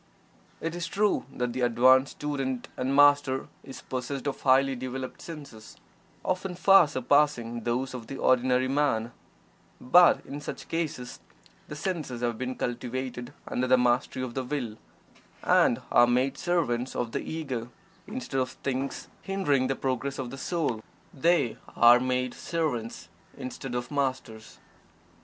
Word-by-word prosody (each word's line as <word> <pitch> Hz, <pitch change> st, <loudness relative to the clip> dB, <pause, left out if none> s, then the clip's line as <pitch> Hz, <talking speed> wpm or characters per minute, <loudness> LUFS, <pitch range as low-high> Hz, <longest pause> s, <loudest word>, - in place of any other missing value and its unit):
It 165 Hz, 0 st, -3 dB
is 175 Hz, -1 st, -3 dB
true 205 Hz, +4 st, +1 dB
that 125 Hz, -2 st, -3 dB
the 130 Hz, -, -3 dB
advanced 130 Hz, +2 st, +4 dB
student 135 Hz, -4 st, -3 dB
and 130 Hz, +2 st, -1 dB
Master 145 Hz, -2 st, +4 dB
is 135 Hz, -, -10 dB
possessed 130 Hz, +2 st, -4 dB
of 140 Hz, -, -3 dB
highly 135 Hz, 0 st, +4 dB
developed 130 Hz, +1 st, -6 dB
senses, 140 Hz, -10 st, -10 dB, 0.5 s
often 185 Hz, 0 st, -2 dB
far 195 Hz, -1 st, +6 dB
surpassing 130 Hz, -4 st, +1 dB
those 125 Hz, +3 st, -1 dB
of 120 Hz, -3 st, -7 dB
the 135 Hz, -, -6 dB
ordinary 130 Hz, 0 st, +3 dB
man, 130 Hz, -5 st, +1 dB, 0.7 s
but 175 Hz, +7 st, +5 dB
in 145 Hz, +1 st, -7 dB
such -, -, -7 dB
cases 155 Hz, -7 st, -4 dB, 0.5 s
the 150 Hz, -, -7 dB
senses 150 Hz, -7 st, -4 dB
have 120 Hz, -1 st, 0 dB
been 130 Hz, 0 st, -3 dB
cultivated 125 Hz, +1 st, -4 dB, 0.2 s
under 130 Hz, +1 st, -1 dB
the 130 Hz, 0 st, +5 dB
mastery 125 Hz, +1 st, +1 dB
of 125 Hz, -2 st, -5 dB
the 130 Hz, -, -2 dB
Will, 125 Hz, -5 st, -3 dB, 0.7 s
and -, -, +3 dB
are 120 Hz, 0 st, +6 dB
made 130 Hz, +3 st, +1 dB
servants 135 Hz, -8 st, -1 dB
of 120 Hz, -2 st, -2 dB
the -, -, -2 dB
Ego 130 Hz, -7 st, -4 dB, 0.4 s
instead 210 Hz, -, -3 dB
of 130 Hz, 0 st, 0 dB
things 135 Hz, +1 st, -4 dB
hindering 145 Hz, -10 st, +1 dB
the 135 Hz, -, 0 dB
progress 135 Hz, +1 st, -2 dB
of 125 Hz, -2 st, -5 dB
the 135 Hz, -, -7 dB
soul 145 Hz, -10 st, -2 dB, 0.3 s
they 160 Hz, -5 st, +2 dB, 0.2 s
are 120 Hz, +1 st, +7 dB
made 125 Hz, 0 st, -1 dB
servants 145 Hz, -9 st, -3 dB, 0.3 s
instead 130 Hz, 0 st, -6 dB
of 120 Hz, +2 st, -4 dB
masters. 130 Hz, -6 st, -3 dB
130 Hz, 145 wpm, -28 LUFS, 125-145 Hz, 0.7 s, are